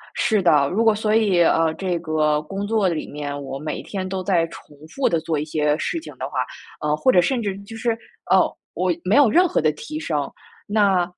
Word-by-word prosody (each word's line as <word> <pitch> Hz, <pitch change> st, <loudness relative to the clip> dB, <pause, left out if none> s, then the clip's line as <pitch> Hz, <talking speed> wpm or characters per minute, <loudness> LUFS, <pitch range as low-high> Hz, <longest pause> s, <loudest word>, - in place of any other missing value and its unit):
是 215 Hz, -3 st, +2 dB
的， 150 Hz, -6 st, +4 dB
如 215 Hz, +5 st, +1 dB
果 225 Hz, -1 st, +5 dB
所 215 Hz, 0 st, 0 dB
以， 200 Hz, -6 st, +3 dB
呃， 165 Hz, -1 st, +3 dB
这 185 Hz, -3 st, -2 dB
个 155 Hz, -2 st, +1 dB
工 195 Hz, +6 st, -5 dB
作 215 Hz, -3 st, +2 dB
里 165 Hz, -3 st, -3 dB
面， 145 Hz, -1 st, -5 dB
我 135 Hz, 0 st, -5 dB
每 150 Hz, 0 st, -4 dB
天 190 Hz, -2 st, -5 dB
都 190 Hz, 0 st, -3 dB
在 180 Hz, -4 st, +2 dB
重 150 Hz, -2 st, -14 dB
复 270 Hz, +11 st, -1 dB
地 165 Hz, -, +1 dB
做 155 Hz, -1 st, -2 dB
一 150 Hz, -, -3 dB
些 150 Hz, -1 st, 0 dB
事 335 Hz, -, -2 dB
情 320 Hz, -, -11 dB
的 -, -, -4 dB
话， -, -, -3 dB, 0.4 s
呃， 150 Hz, 0 st, +1 dB
或 260 Hz, +12 st, +3 dB
者 180 Hz, -, +5 dB
甚 250 Hz, +6 st, 0 dB
至 200 Hz, -3 st, -3 dB
就 225 Hz, +3 st, -10 dB
是， 235 Hz, +1 st, 0 dB, 0.4 s
哦， -, -, +4 dB, 0.2 s
我 185 Hz, 0 st, 0 dB
没 190 Hz, +4 st, +2 dB
有 285 Hz, -5 st, +6 dB
任 360 Hz, +11 st, +4 dB
何 -, -, 0 dB
的 155 Hz, 0 st, +3 dB
提 305 Hz, -, -7 dB
升。 320 Hz, -, -2 dB, 0.4 s
那， 200 Hz, -4 st, +3 dB
185 Hz, 240 characters per minute, -22 LUFS, 155-215 Hz, 0.4 s, 有